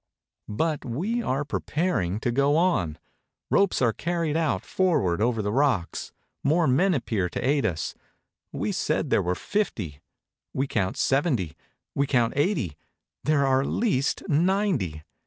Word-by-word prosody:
But 150 +8 -1
we 190 - -2
are 140 - -1
preparing 140 - -1
to 120 - 0
go 140 +4 +3
on. 130 - +1 0.5
Ropes 200 -8 +3
are 115 -2 +3
carried 170 0 -1
out 150 - 0
forward 130 - +1
over 115 -1 +1
the 105 - -1
rocks. 125 -8 0 0.3
More 160 +4 +3
men 175 +8 +3
appear, 105 -8 -1
to 120 - -3
aid 140 0 +2
us. 85 +1 -3 0.6
We - - -2
said - - -1
there - - +4
were 90 +1 -1
fifty. 100 - -2 0.5
We 135 - +1
count 100 -8 -1
seventy; 135 - +1 0.4
we 140 0 +1
count 120 -4 +2
eighty; 140 - 0 0.5
there 145 -2 +3
are 135 0 +3
at 140 - -2
least 185 - 0
ninety. 155 - +1
135 Hz, 145 wpm, -26 LUFS, 105-165 Hz, 0.6 s, there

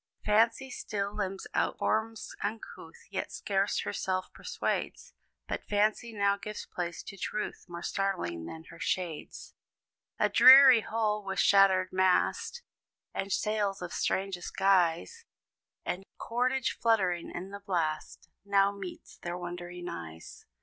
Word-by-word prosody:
Fancy 230 +5 +3
still 200 -3 -3
limns 195 -2 -3
out - - 0
forms 220 0 -1
uncouth, 215 +2 -6
Yet - - -3
scarce 195 0 0
herself 185 -2 -3
persuades; - - -3 0.3
But - - -3
fancy 215 +3 +1
now 200 -2 +1
gives 210 +1 -7
place 175 -1 -5
to 195 - -9
truth 210 +2 -4
More 170 0 -7
startling 180 - -2
than 160 - -8
her 170 - -13
shades. 175 -3 -4 0.6
A - - +3
dreary 260 -2 +9
hull, 215 -1 -1
with 195 0 -4
shattered 190 -2 +5
mast, 185 - +1 0.5
And 195 0 -3
sails 205 -1 0
of 175 - -6
strangest 190 -2 -2
guise, 190 - +2 0.6
And 185 +2 -3
cordage 250 +2 -1
fluttering 190 -7 +2
in 185 +3 -7
the 200 - -7
blast, 170 -6 -3 0.2
Now 200 0 +3
meets 195 -3 -9
their 175 0 -4
wondering 175 0 -7
eyes. 80 - -9
195 Hz, 130 wpm, -30 LUFS, 180-215 Hz, 0.6 s, dreary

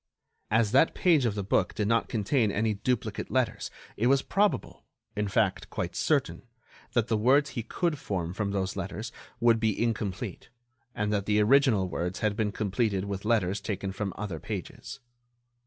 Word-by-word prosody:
As 110 -1 +2
that 135 +6 +4
page 160 -8 +4
of 110 -3 0
the 100 - -2
book 95 - +1
did 105 - 0
not 115 +1 +1
contain 110 0 +1
any 110 +2 +1
duplicate 110 0 -2
letters 115 -5 0 0.3
it 115 - +1
was 135 +1 +4
probable, 205 +1 0 0.3
in 105 0 -1
fact 100 0 0
quite - - -4
certain, - - +1 0.5
that 120 -1 +2
the 115 - +1
words 135 +7 +3
he 120 - -3
could 160 +6 -2
form 90 -6 -3
from 100 +1 -2
those 100 -1 -2
letters 100 +3 -5 0.3
would 115 -1 +4
be 110 -2 0
incomplete, 105 -5 -2 0.5
and 105 0 -1
that 100 -1 -1
the 105 0 +3
original 110 -3 +4
words 90 +1 -3
had 105 -1 +1
been 105 -1 0
completed 100 -1 -1
with 100 0 -5
letters 105 -3 +1
taken 100 -2 -3
from 100 0 -3
other 95 -6 -4
pages. 135 - -7
105 Hz, 170 wpm, -28 LUFS, 100-120 Hz, 0.5 s, that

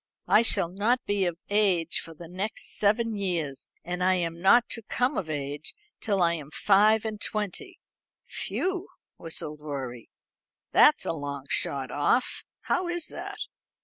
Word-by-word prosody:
"I 215 - +6
shall 195 -6 +3
not 220 +7 0
be 205 -2 +1
of 175 -2 -2
age 190 -6 +2
for 165 - -10
the 170 +2 -10
next 190 +5 -3
seven 215 +2 +2
years. 170 -9 -2 0.2
I 180 +2 +1
am 170 -1 -2
not 230 +6 +6
to 230 - -4
come 250 +5 0
of 160 - -3
age 145 - -4 0.2
till 200 -4 +1
I 170 0 +3
am 150 -4 -6
five 210 +6 +4
and 215 -1 -4
twenty." 220 - -4 0.5
"Phew!" 375 +1 -3 0.3
whistled 155 -2 -4
Rorie, 130 -5 -6 0.6
"That's - - +5
a - - 0
long 140 -3 -5
shot 135 -3 +2
off. 145 - +1 0.2
How 360 - 0
is 345 -2 -2
that?" - - -7
185 Hz, 150 wpm, -27 LUFS, 155-215 Hz, 0.6 s, I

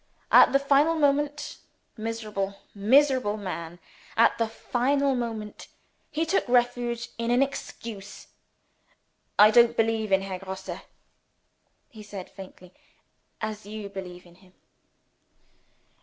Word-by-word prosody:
At - - +8
the 275 - +5
final 280 +4 +3
moment 290 -1 0 0.4
miserable, 215 -3 -4 0.2
miserable 250 0 +3
man! 175 -4 -6 0.4
at - - +5
the 230 - +2
final 270 +5 0
moment, 225 -4 -5 0.4
he 320 +1 -1
took 325 -5 0
refuge 245 -1 +1
in 230 0 -1
an 245 +3 +4
excuse. 220 -6 -7 1.1
"I 210 +1 +8
don't 235 0 +5
believe 225 -2 0
in 190 0 +3
Herr 190 -1 -5
Grosse," 190 0 -7 1.1
he 220 - -12
said 200 -3 -9
faintly, 185 -1 -13 0.7
"as 215 -2 -5
you 210 -1 -7
believe 180 -2 -8
in 175 - -17
him." 185 -1 -22
225 Hz, 115 wpm, -26 LUFS, 200-255 Hz, 1.1 s, At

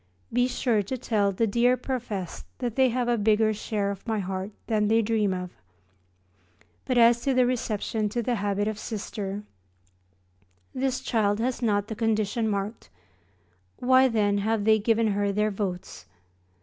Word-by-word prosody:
Be 245 +1 +3
sure 240 -4 +1
to 230 +7 -4
tell 210 -4 +1
the 210 +4 +1
dear 240 +4 +3
professed 235 -9 -5
that 240 -3 -3
they 265 -1 +4
have 245 0 -1
a 240 -1 +1
bigger 215 +1 +3
share 205 -1 -2
of 200 +3 -9
my 220 -1 0
heart 190 0 -3 0.2
than 215 -2 +1
they 225 +1 +3
dream 215 -2 +1
of. 180 -1 -4 1.3
But 255 - 0
as 235 0 +5
to 275 -2 0
the 255 -1 +4
reception 220 -3 -1
to 235 +3 -2
the 245 - 0
habit 205 0 -1
of 215 -1 -3
Sister 205 -2 -5 1.3
this 260 0 -1
child 205 -4 +1
has 250 +2 -1
not 205 -4 +1
the 220 - -5
conditions 220 0 0
marked, 205 +2 -4 0.9
why 260 +1 +5
then 205 -4 +1
have 220 +1 0
they 220 0 +5
given 225 +1 +2
her 200 0 0
their 210 +1 +1
votes? 180 - -5
220 Hz, 160 wpm, -26 LUFS, 205-240 Hz, 1.3 s, as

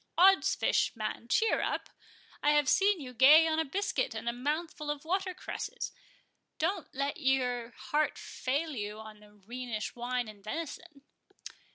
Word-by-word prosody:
Oddsfish, 380 -5 +4
man, 220 +1 -4
cheer 445 - +2
up! - - -2 0.5
I 295 - +4
have 295 -2 +3
seen 395 +4 +4
you 255 -4 -8
gay 290 +7 +8
on 320 0 +1
a - - +3
biscuit 375 - -1
and 225 +1 -5
a 235 - +1
mouthful 300 +4 -3
of 295 0 -3
water 375 +2 -1
cresses—don't 370 - -6
let 280 +4 -1
your 250 -4 +1
heart 305 +1 0
fail 290 +5 -2
you 210 -1 -4
on 210 -2 -13
Rhenish 240 -2 -4
wine 245 0 -2
and 205 -2 -12
venison." 305 - -6
275 Hz, 145 wpm, -31 LUFS, 235-325 Hz, 0.5 s, gay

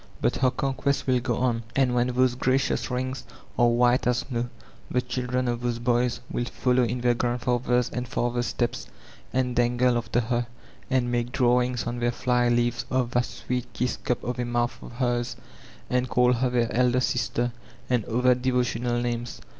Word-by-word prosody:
But - - +1
her 130 - +3
conquests 135 +2 -1
wiO 125 -2 +2
go 120 -2 -1
on, 120 -2 +1
and 130 -2 +3
when 120 0 +2
those 125 0 +2
gnciotis 130 +2 +1
rings 130 +1 -3 0.3
are 120 - +4
white 120 +1 +3
as 125 -1 +1
snow 120 -2 -2 0.4
the 125 - +1
children 125 0 -2
of 120 0 -1
those 120 -1 -1
boys 120 0 +1
will 120 - -1
follow 125 +1 +1
in 120 +1 -1
their 120 0 +3
grandfathers' 125 0 0
and 125 0 -3
fathers' 120 0 -1
steps 120 -1 -2 0.4
and 125 -1 0
dangle 120 0 +3
after 120 +1 0
her, 120 +1 -1 0.4
and 125 -2 +1
make 120 0 -1
draw* 125 -2 +3
ings 125 -1 -2
on 120 +1 -3
their 120 0 +1
fly 125 0 +1
leaves 120 0 +1
of 125 -2 0
that 120 0 +2
sweet 125 -1 -4
Idss 125 -1 0
cup 125 - -1
of 125 0 -3
a - - +1
mouth 120 0 0
of - - -10
hers, 120 -1 -1 0.5
and 125 0 0
call 125 0 +4
her 125 +1 +1
their 120 -2 0
elder 125 0 +3
sbter, 120 -1 0 0.4
and 125 -3 +1
other 125 +2 +3
devo 125 0 +1
tional 120 0 -1
names. 120 0 -3
125 Hz, 185 wpm, -26 LUFS, 120-125 Hz, 0.5 s, are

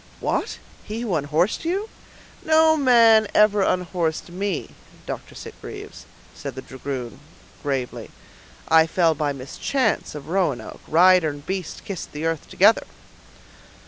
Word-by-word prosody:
"What? - - -2 0.3
He 220 +2 -5
who 225 -6 -2
unhorsed 155 +5 0
you?" 380 +6 -1 0.6
"No 315 0 +5
man 230 -6 +5
ever 210 -1 +5
unhorsed 175 -3 -1
me, 190 -1 -3 0.3
Dr. - - -7
Sitgreaves," - - -10 0.3
said - - -7
the 130 - -7
dragoon, 130 -2 -6 0.4
gravely. 135 -4 -3 0.6
"I 160 0 +5
fell 165 -1 +2
by 150 -1 -1
mischance 150 - -2
of 145 -1 -8
Roanoke; 175 -8 -1
rider 180 0 +5
and 145 -1 -9
beast 185 -3 -5
kissed 195 -5 -6
the 150 +2 -4
earth 165 -2 -2
together." - - +4
175 Hz, 125 wpm, -23 LUFS, 150-210 Hz, 0.6 s, No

